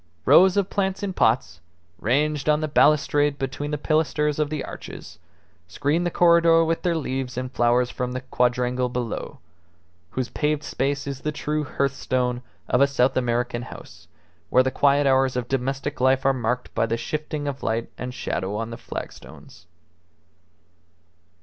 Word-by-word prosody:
Rows 190 +2 +6
of 200 -2 +1
plants 195 0 -1
in 195 -2 -2
pots, 100 - +1 0.4
ranged 150 +6 0
on 150 0 +4
the 155 - -1
balustrade 145 -1 +3
between 135 +2 -4
the 150 - -2
pilasters 150 -1 0
of 150 -1 +1
the 150 -2 -3
arches, 80 +2 -10 0.5
screened 145 - 0
the - - +1
corredor 170 -1 +5
with 165 0 -1
their 175 -2 0
leaves 130 -5 -3
and 130 0 -3
flowers 120 0 +2
from 125 0 -3
the 130 - -4
quadrangle 125 0 0
below, 120 -2 -4 0.7
whose 130 +5 -3
paved 150 0 -1
space 140 +1 -2
is 140 -2 -5
the 150 - -2
true 150 0 -2
hearthstone 130 -3 -1 0.3
of 125 - +2
a 140 - +6
South 135 -2 +1
American 120 -1 0
house, 125 - -12 0.4
where 130 - +5
the 130 - 0
quiet 140 +1 +3
hours 135 -1 +3
of 125 -1 -2
domestic 135 +2 -2
life 130 +1 +3
are 135 - +4
marked 125 0 -2
by - - +1
the 115 +1 -1
shifting 150 +3 -4
of 140 -1 -4
light 115 +1 -2
and 125 0 -5
shadow 105 -4 -3
on 115 +2 -3
the 115 - -6
flagstones. 85 -6 -10
135 Hz, 160 wpm, -24 LUFS, 125-150 Hz, 0.7 s, Rows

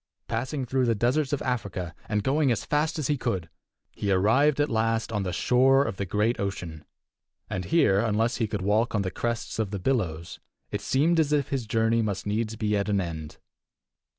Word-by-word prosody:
Passing 130 +4 -2
through 130 +1 +1
the 115 - +2
deserts 130 +6 +1
of 145 - -1
Africa, 100 -8 -3 0.2
and 105 -1 0
going 140 +1 +2
as 115 - -1
fast 155 +2 0
as 155 - -2
he 145 +2 +1
could, 95 -10 -2 0.4
he 100 - -2
arrived 130 +10 +3
at 145 - +3
last 115 -1 0
on 105 -2 -1
the 95 -2 -2
shore 135 +8 +4
of 95 - -4
the 100 - -3
great 105 +5 +1
ocean. 90 -6 -4 0.7
And 90 -1 -3
here, 100 - +3
unless 115 +2 +1
he 115 - 0
could 105 -3 -3
walk 110 +4 +1
on 100 - +1
the 95 - -3
crests 120 +1 -3
of 110 -3 0
the 100 - -3
billows, 90 -8 -2 0.3
it 105 - -3
seemed 150 +9 +2
as 150 -2 +2
if 145 -3 +1
his 130 -5 -2
journey 115 +1 +2
must 100 -3 -2
needs 110 +2 -1
be 105 -1 0
at 100 +1 -1
an 100 -1 +2
end. 80 -4 -5
115 Hz, 205 wpm, -26 LUFS, 100-130 Hz, 0.7 s, shore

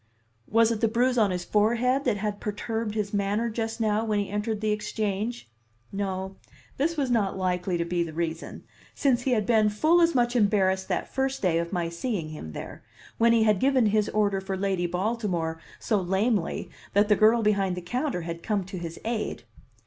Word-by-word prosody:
Was 230 +1 +4
it 225 -1 -2
the 225 - +4
bruise 245 +2 +2
on 210 -3 +4
his 180 -1 -3
forehead 240 +6 +2
that 235 -5 +1
had 205 0 -3
perturbed 215 +1 -3
his 210 -2 -2
manner 205 +3 0
just 225 +1 -3
now 215 -1 +1
when 215 -2 0
he 200 -1 -2
entered 210 +1 -2
the 215 0 0
Exchange? 210 - -2 0.4
No, 190 -1 -3 0.4
this 325 +4 0
was 270 -4 0
not 205 -5 +1
likely 180 -1 -1
to 170 - -1
be 175 0 -1
the 170 -1 -2
reason, 165 0 -4 0.3
since 255 -4 +2
he 255 0 +1
had 215 -3 +1
been 215 -2 +4
full 310 +12 +3
as 335 -3 +3
much 240 0 +2
embarrassed 195 -4 +2
that - - -3
first 270 -2 -1
day 170 -3 +3
of 170 0 -3
my 175 -3 -1
seeing 170 -1 -3
him 115 - -8
there, - - -8 0.4
when 230 0 +5
he 230 -1 +4
had 210 -3 +3
given 265 -1 +3
his 210 0 +2
order 200 -2 +1
for 190 0 -4
Lady 190 -2 0
Baltimore 180 -4 -2 0.2
so 210 -4 0
lamely 190 +1 0 0.2
that 205 +1 +4
the 210 - +5
girl 220 +2 +4
behind 195 -3 +1
the - - -4
counter 250 - -2
had 170 0 -6
come 205 -1 -1
to 185 0 -7
his 170 -1 -6
aid. 225 - -3
210 Hz, 200 wpm, -26 LUFS, 190-230 Hz, 0.4 s, when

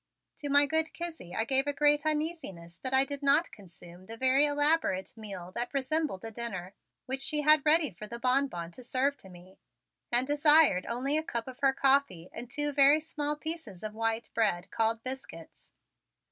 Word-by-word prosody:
To 290 - -4
my 285 +1 +5
good 320 +2 -1
Kizzie 325 - -7
I 225 - 0
gave 270 +3 +2
a 290 - +1
great 295 +1 +2
uneasiness 300 - -3
that 260 - -3
I 265 +1 +3
did 285 0 -6
not 285 +4 +2
consume 175 -2 -15
the 225 - -9
very 260 +4 +4
elaborate 290 - 0
meal 195 -5 -8
that 240 +6 -4
resembled 275 -6 -1
a 225 - -5
dinner, 205 -5 -5 0.3
which 265 +1 -3
she 300 +2 0
had 305 -1 +6
ready 305 -2 +4
for 210 +4 -10
the 235 - -7
Bonbon 250 -9 -1
to 255 - -13
serve 265 +3 0
to 190 - -15
me, 180 +1 -16 0.5
and 240 +2 +2
desired 295 - +4
only 270 +6 0
a - - -5
cup 235 -6 -4
of 260 0 -10
her 275 -1 +3
coffee 270 -11 +1
and 240 - -8
two 295 +3 0
very 280 +2 +5
small 300 -2 -4
pieces 315 - -7
of 215 -1 -5
white 225 +1 -2
bread 195 -5 0
called 225 0 -1
biscuits. 265 +1 -8
265 Hz, 190 wpm, -29 LUFS, 220-295 Hz, 0.5 s, had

